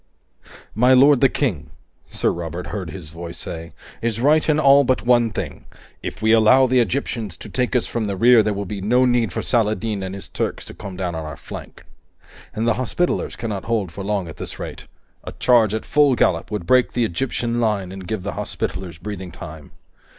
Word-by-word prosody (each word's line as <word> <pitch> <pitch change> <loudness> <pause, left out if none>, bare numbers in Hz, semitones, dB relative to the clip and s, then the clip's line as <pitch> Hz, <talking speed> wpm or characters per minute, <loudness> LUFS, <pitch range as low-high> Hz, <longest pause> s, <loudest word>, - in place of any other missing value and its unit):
"My 125 +4 +5
lord 140 +1 +6
the 135 - +6
King," 110 - -2 0.4
Sir - - 0
Robert 85 +1 -5
heard 95 -5 -5
his 80 -3 -9
voice 85 +1 -8
say, 85 0 -7 0.3
"is 115 -1 -1
right 150 +5 +3
in 155 0 +3
all 140 -1 +6
but 130 -2 0
one 120 -2 +4
thing. 105 - -6 0.4
If - - -6
we 110 - +4
allow 115 +4 +6
the 130 0 +3
Egyptians 115 -5 -2
to - - -10
take 125 0 -1
us 125 - +2
from 115 -2 -2
the 100 -2 -3
rear, 120 +2 +6
there 105 -1 -1
will 100 0 -3
be 100 +1 -5
no 125 +6 +3
need 120 -5 +2
for - - -3
Saladin 110 -3 0
and 95 0 -5
his 100 - -8
Turks - - -3
to - - -10
come 95 -2 -8
down 90 -2 -2
on 80 -1 -4
our 75 -1 -7
flank. - - -10 0.7
And 110 +2 -1
the 115 - +4
Hospitallers 175 +8 -1
cannot 105 -5 -4
hold 110 -7 -1
for 100 +4 -7
long 100 -3 -1
at 80 - -10
this - - -6
rate. - - -8 0.4
A - - -7
charge 115 -4 +3
at 110 - -4
full 145 -3 +4
gallop 85 -7 +1
would 105 -5 -4
break 125 +3 +3
the 120 -1 +1
Egyptian 120 +4 -2
line 100 -5 0
and 95 -1 -8
give 105 -1 -3
the 100 - -3
Hospitallers 90 -1 -4
breathing 95 0 -7
time. 75 -1 -10
110 Hz, 210 wpm, -21 LUFS, 95-125 Hz, 0.7 s, lord